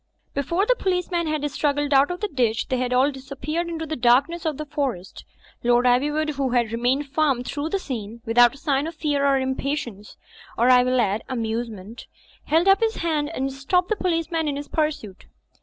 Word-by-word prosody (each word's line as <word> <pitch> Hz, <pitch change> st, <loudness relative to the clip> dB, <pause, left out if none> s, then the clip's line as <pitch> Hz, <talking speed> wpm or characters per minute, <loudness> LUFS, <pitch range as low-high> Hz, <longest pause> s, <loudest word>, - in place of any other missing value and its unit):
Before 335 Hz, +8 st, 0 dB
the -, -, +3 dB
policeman 360 Hz, -4 st, -1 dB
had 305 Hz, -1 st, -1 dB
struggled 290 Hz, 0 st, 0 dB
out 275 Hz, +1 st, +5 dB
of 355 Hz, 0 st, -5 dB
the 420 Hz, -, 0 dB
ditch, 240 Hz, -, -1 dB
they 255 Hz, -, 0 dB
had 250 Hz, 0 st, -2 dB
all 260 Hz, +3 st, +3 dB
disappeared 275 Hz, +5 st, -4 dB
into 325 Hz, -1 st, -4 dB
the 315 Hz, 0 st, -4 dB
darkness 275 Hz, +8 st, +2 dB
of 305 Hz, -3 st, -2 dB
the 305 Hz, -, -5 dB
forest. 275 Hz, -, -4 dB, 0.4 s
Lord 240 Hz, +1 st, +3 dB
Ivywood 295 Hz, +5 st, +2 dB
who 270 Hz, -2 st, 0 dB
had 240 Hz, -3 st, +1 dB
remained 245 Hz, +5 st, 0 dB
firm 280 Hz, -4 st, +1 dB
through 290 Hz, +4 st, -4 dB
the 395 Hz, -, 0 dB
scene, 235 Hz, -, -6 dB
without 240 Hz, +2 st, +5 dB
a -, -, -13 dB
sign 280 Hz, 0 st, 0 dB
of 330 Hz, -, -7 dB
fear 295 Hz, -3 st, -1 dB
or 275 Hz, -1 st, +3 dB
impatience 260 Hz, -5 st, -3 dB, 0.4 s
(or, 240 Hz, +3 st, +4 dB
I 250 Hz, 0 st, +7 dB
will 255 Hz, 0 st, +1 dB
add, 210 Hz, -2 st, +1 dB
amusement), 225 Hz, -3 st, -4 dB, 0.4 s
held 330 Hz, +4 st, +2 dB
up 390 Hz, 0 st, +6 dB
his 450 Hz, -1 st, 0 dB
hand 310 Hz, -3 st, -1 dB
and 270 Hz, +1 st, -2 dB
stopped 360 Hz, +7 st, 0 dB
the 435 Hz, -, +1 dB
policeman 330 Hz, -4 st, -1 dB
in 285 Hz, -, -1 dB
his 285 Hz, +1 st, -6 dB
pursuit. 290 Hz, -, -3 dB
280 Hz, 195 wpm, -23 LUFS, 245-315 Hz, 0.4 s, I